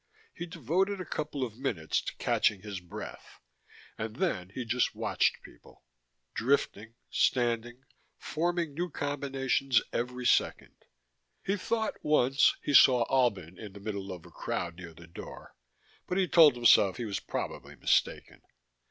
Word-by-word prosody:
He 175 Hz, -, -6 dB
devoted 180 Hz, -, -1 dB
a 185 Hz, -, -5 dB
couple 150 Hz, -3 st, -3 dB
of 115 Hz, -1 st, -6 dB
minutes 95 Hz, -, -1 dB
to -, -, -6 dB
catching 100 Hz, -3 st, +1 dB
his 100 Hz, -3 st, -5 dB
breath, 90 Hz, -1 st, -10 dB, 0.6 s
and 110 Hz, 0 st, -4 dB
then 125 Hz, -, -1 dB
he 120 Hz, +5 st, -6 dB
just 120 Hz, +2 st, 0 dB
watched -, -, 0 dB
people, -, -, -17 dB, 0.5 s
drifting, 115 Hz, -3 st, 0 dB, 0.2 s
standing, 120 Hz, 0 st, 0 dB, 0.3 s
forming 170 Hz, -1 st, -2 dB
new 175 Hz, +4 st, -3 dB
combinations 135 Hz, -3 st, 0 dB
every 125 Hz, +1 st, -3 dB
second. -, -, 0 dB, 0.6 s
He 195 Hz, -, 0 dB
thought 220 Hz, +2 st, -2 dB
(once) 135 Hz, -2 st, +3 dB
he 145 Hz, -, -1 dB
saw 125 Hz, -2 st, +7 dB
Albin 100 Hz, -10 st, +1 dB
in 105 Hz, -3 st, -9 dB
the 100 Hz, -, -10 dB
middle 100 Hz, -2 st, -5 dB
of 90 Hz, -3 st, -9 dB
a -, -, -14 dB
crowd 85 Hz, -1 st, -4 dB
near 85 Hz, -3 st, -10 dB
the 85 Hz, +2 st, -13 dB
door, 85 Hz, -, -11 dB, 0.5 s
but 180 Hz, -, -1 dB
he 190 Hz, -1 st, +2 dB
told 160 Hz, -6 st, +7 dB
himself 110 Hz, -5 st, +5 dB
he 120 Hz, -, -3 dB
was 100 Hz, -2 st, -3 dB
probably -, -, -5 dB
mistaken. -, -, 0 dB
125 Hz, 145 wpm, -30 LUFS, 105-150 Hz, 0.6 s, saw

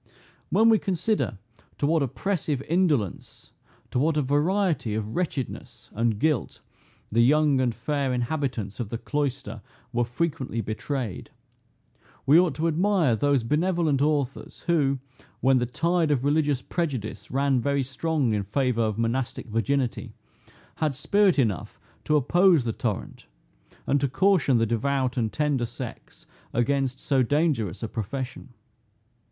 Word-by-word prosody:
When 225 Hz, -, +4 dB
we 220 Hz, -2 st, +5 dB
consider 185 Hz, -, -1 dB, 0.4 s
to -, -, 0 dB
what 160 Hz, +1 st, +2 dB
oppressive 145 Hz, -, -2 dB
indolence, 155 Hz, -, -1 dB, 0.4 s
to -, -, 0 dB
what 155 Hz, +3 st, +2 dB
a 150 Hz, -, +2 dB
variety 150 Hz, -, +1 dB
of 110 Hz, 0 st, -4 dB
wretchedness 155 Hz, -8 st, -4 dB
and 115 Hz, -1 st, 0 dB
guilt, 150 Hz, +1 st, 0 dB, 0.5 s
the 115 Hz, +2 st, +3 dB
young 145 Hz, +1 st, +4 dB
and 120 Hz, -3 st, 0 dB
fair 140 Hz, +3 st, -1 dB
inhabitants 125 Hz, -5 st, -2 dB
of 115 Hz, -4 st, -3 dB
the 115 Hz, -, -3 dB
cloister 135 Hz, -6 st, -3 dB, 0.3 s
were 120 Hz, 0 st, +2 dB
frequently 130 Hz, -1 st, -2 dB
betrayed, 110 Hz, +1 st, -4 dB, 1.0 s
we 150 Hz, +5 st, +7 dB
ought 175 Hz, -6 st, +2 dB
to 160 Hz, +3 st, 0 dB
admire 165 Hz, -, +2 dB
those 140 Hz, +1 st, +2 dB
benevolent 155 Hz, +1 st, +1 dB
authors 145 Hz, -3 st, -1 dB
who, 145 Hz, -5 st, +1 dB, 0.4 s
when 130 Hz, 0 st, +4 dB
the 120 Hz, -, -1 dB
tide 170 Hz, +5 st, +1 dB
of 140 Hz, -4 st, +1 dB
religious 145 Hz, -3 st, +1 dB
prejudice 140 Hz, -, -3 dB
ran 135 Hz, -1 st, +1 dB
very 140 Hz, +1 st, +1 dB
strong 135 Hz, -1 st, -1 dB
in 105 Hz, -, 0 dB
favor 120 Hz, +4 st, 0 dB
of 110 Hz, -2 st, 0 dB
monastic 120 Hz, +3 st, -1 dB
virginity, 125 Hz, +3 st, -1 dB, 0.6 s
had 150 Hz, -3 st, 0 dB
spirit 200 Hz, +6 st, +3 dB
enough 110 Hz, -9 st, -1 dB, 0.3 s
to 150 Hz, -, +2 dB
oppose 170 Hz, +2 st, +4 dB
the 115 Hz, -2 st, -2 dB
torrent, 105 Hz, -4 st, -4 dB, 0.6 s
and 140 Hz, -, +1 dB
to 140 Hz, -, +2 dB
caution 165 Hz, -3 st, +3 dB
the 115 Hz, -, +2 dB
devout 130 Hz, +3 st, 0 dB
and 115 Hz, -4 st, 0 dB
tender 145 Hz, -5 st, 0 dB
sex 120 Hz, 0 st, -9 dB, 0.3 s
against 130 Hz, +2 st, 0 dB
so 135 Hz, -2 st, +1 dB
dangerous 130 Hz, -, 0 dB
a -, -, -1 dB
profession. 125 Hz, +3 st, -5 dB
135 Hz, 140 wpm, -26 LUFS, 120-155 Hz, 1.0 s, we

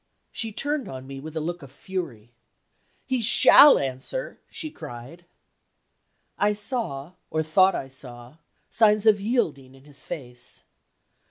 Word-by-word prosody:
She 225 Hz, -1 st, -3 dB
turned 280 Hz, -1 st, -3 dB
on 130 Hz, 0 st, -8 dB
me 135 Hz, 0 st, -9 dB
with 155 Hz, +3 st, -10 dB
a -, -, 0 dB
look 170 Hz, +2 st, -4 dB
of 140 Hz, -, -13 dB
fury. 145 Hz, -, -7 dB, 0.7 s
"He 260 Hz, -2 st, -1 dB
shall 275 Hz, +5 st, +8 dB
answer," 135 Hz, -, -5 dB
she 310 Hz, -, -7 dB
cried. 150 Hz, -, -11 dB, 1.1 s
I 205 Hz, +1 st, +2 dB
saw, 205 Hz, -, -3 dB, 0.2 s
or 160 Hz, 0 st, -1 dB
thought 185 Hz, +5 st, +3 dB
I 135 Hz, -, -4 dB
saw, 125 Hz, 0 st, -11 dB, 0.3 s
signs 215 Hz, -1 st, +3 dB
of 210 Hz, -2 st, +4 dB
yielding 155 Hz, -, -2 dB
in 135 Hz, -, -19 dB
his 140 Hz, -2 st, -14 dB
face. 125 Hz, -6 st, -10 dB
160 Hz, 140 wpm, -24 LUFS, 135-210 Hz, 1.1 s, shall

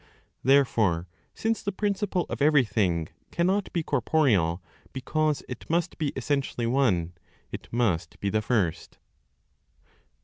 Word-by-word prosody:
Therefore, 115 Hz, -10 st, +3 dB, 0.3 s
since 225 Hz, 0 st, -1 dB
the 200 Hz, -, -2 dB
principle 200 Hz, -3 st, -1 dB
of -, -, -5 dB
everything 110 Hz, -, +2 dB, 0.2 s
cannot 190 Hz, +3 st, 0 dB
be 170 Hz, -, -1 dB
corporeal, 120 Hz, -, +2 dB, 0.3 s
because 155 Hz, +3 st, 0 dB
it 125 Hz, -, -8 dB
must 170 Hz, +1 st, 0 dB
be 150 Hz, -3 st, 0 dB
essentially 135 Hz, -2 st, -1 dB
one, 110 Hz, -10 st, +1 dB, 0.4 s
it -, -, -8 dB
must 95 Hz, -9 st, 0 dB
be 100 Hz, -, -1 dB
the 110 Hz, -, +1 dB
First. 105 Hz, -8 st, -1 dB
130 Hz, 115 wpm, -27 LUFS, 100-155 Hz, 0.4 s, Therefore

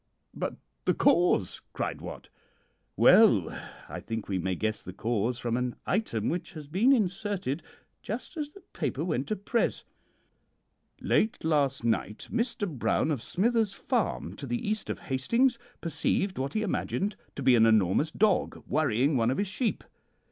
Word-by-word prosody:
"'But -, -, -3 dB, 0.3 s
the -, -, +3 dB
cause?' 175 Hz, -, +3 dB
cried -, -, -3 dB
Wat. -, -, -8 dB, 0.7 s
"'Well, -, -, +6 dB, 0.3 s
I -, -, -6 dB
think 110 Hz, -2 st, -5 dB
we 95 Hz, -2 st, -1 dB
may 95 Hz, +1 st, -1 dB
guess 110 Hz, +3 st, -1 dB
the 90 Hz, -, -8 dB
cause 115 Hz, +3 st, -1 dB
from 120 Hz, -1 st, -1 dB
an 125 Hz, 0 st, -1 dB
item 175 Hz, -, 0 dB
which 180 Hz, +2 st, -3 dB
has 155 Hz, -3 st, -8 dB
been 190 Hz, -, +3 dB
inserted 195 Hz, -, 0 dB, 0.4 s
just 235 Hz, -, -5 dB
as 300 Hz, -3 st, -3 dB
the 395 Hz, +7 st, -15 dB
paper -, -, -2 dB
went -, -, -1 dB
to 215 Hz, -, 0 dB
press: 220 Hz, +4 st, -1 dB, 1.2 s
"Late 220 Hz, -, +1 dB
last 145 Hz, -5 st, +1 dB
night, 110 Hz, -2 st, -1 dB
Mr. 235 Hz, -2 st, -1 dB
Brown, 155 Hz, 0 st, 0 dB
of 140 Hz, -6 st, -1 dB
Smither's 220 Hz, -, +1 dB
Farm, 245 Hz, 0 st, -1 dB
to 140 Hz, -, -7 dB
the 120 Hz, -, -2 dB
east 215 Hz, +1 st, -2 dB
of -, -, -2 dB
Hastings, 235 Hz, -, +1 dB, 0.2 s
perceived 170 Hz, +3 st, -1 dB
what 135 Hz, +7 st, -3 dB
he 215 Hz, -, +1 dB
imagined 205 Hz, 0 st, -1 dB, 0.2 s
to 140 Hz, -, -4 dB
be 130 Hz, -1 st, +6 dB
an 115 Hz, -1 st, +6 dB
enormous 110 Hz, -, +3 dB
dog 205 Hz, +2 st, +1 dB
worrying 140 Hz, -1 st, +2 dB
one 115 Hz, -1 st, +2 dB
of 130 Hz, -, 0 dB
his 205 Hz, -, +1 dB
sheep. 220 Hz, +4 st, -1 dB
160 Hz, 160 wpm, -29 LUFS, -, 1.2 s, Well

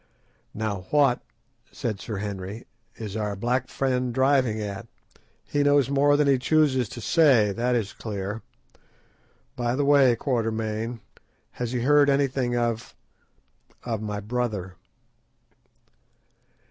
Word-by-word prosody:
"Now 100 Hz, -4 st, -3 dB
what," 140 Hz, -4 st, +3 dB, 0.5 s
said 110 Hz, -4 st, -4 dB
Sir 110 Hz, -4 st, -5 dB
Henry, 100 Hz, +2 st, -5 dB, 0.3 s
"is 105 Hz, -2 st, -7 dB
our 105 Hz, -2 st, -2 dB
black 125 Hz, +5 st, -1 dB
friend 125 Hz, -2 st, -1 dB
driving 130 Hz, -3 st, +2 dB
at? 100 Hz, -2 st, -5 dB, 0.6 s
He 145 Hz, -, 0 dB
knows 145 Hz, -2 st, +3 dB
more 145 Hz, +1 st, +4 dB
than 150 Hz, -1 st, +2 dB
he 135 Hz, -2 st, +4 dB
chooses 130 Hz, -4 st, +2 dB
to -, -, -8 dB
say, 130 Hz, -9 st, +4 dB
that 120 Hz, +4 st, 0 dB
is 105 Hz, -4 st, -2 dB
clear. 105 Hz, 0 st, -5 dB, 1.1 s
By 120 Hz, 0 st, -1 dB
the 145 Hz, +1 st, 0 dB
way, 140 Hz, -4 st, +5 dB
Quatermain, 115 Hz, -2 st, -2 dB, 0.5 s
has 120 Hz, -1 st, -4 dB
he 125 Hz, -1 st, -1 dB
heard 145 Hz, +2 st, +5 dB
anything 135 Hz, -3 st, +1 dB
of—of 115 Hz, -1 st, -6 dB
my 105 Hz, -1 st, -3 dB
brother?" 105 Hz, -4 st, -3 dB
120 Hz, 120 wpm, -25 LUFS, 110-135 Hz, 1.1 s, way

